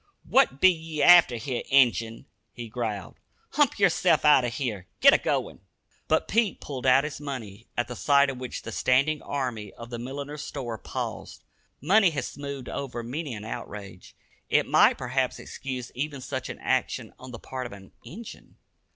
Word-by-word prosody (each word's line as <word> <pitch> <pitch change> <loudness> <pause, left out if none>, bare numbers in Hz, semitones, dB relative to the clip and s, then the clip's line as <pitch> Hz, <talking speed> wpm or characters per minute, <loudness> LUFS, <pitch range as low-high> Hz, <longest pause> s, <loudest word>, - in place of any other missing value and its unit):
"What 130 - +3
be 185 +3 +7
ye 160 -3 -4
after 175 -8 +8
here, 120 +2 -3
Injun?" 120 -4 +3 0.3
he 120 -1 -7
growled. 110 -6 -4 0.3
"Hump 290 -3 +2
yerself 180 -4 +3
outer 140 -4 +6
here 115 -7 -4
git - - +8
a - - +4
goin'!" - - -2 0.5
But 160 - +2
Pete 225 -2 +1
pulled 130 -3 -5
out 130 +2 +6
his 150 -1 -5
money, 115 -7 -7
at 120 0 0
the 125 - -6
sight 140 +2 +3
of 130 - -9
which 125 -2 -6
the 115 - -6
standing 140 +6 +2
army 125 -7 -4
of 115 +1 -11
the 120 - -5
milliner's 140 +4 -6
store 120 -6 -5
paused. - - -6 0.4
Money 195 - +5
has 145 -6 -3
smoothed 140 -2 -7
over 125 -4 -5
many 135 +2 -4
an 105 0 -8
outrage. 100 -4 -8 0.3
It - - +3
might - - +5
perhaps 130 +1 -1
excuse 130 -3 -6
even 140 +2 -4
such 125 - -5
an - - -6
action - - -1
on 130 - -10
the 120 - -7
part 130 +1 -6
of - - -14
an 95 -1 -12
"Injun." 225 +7 -11
130 Hz, 175 wpm, -26 LUFS, 120-150 Hz, 0.5 s, after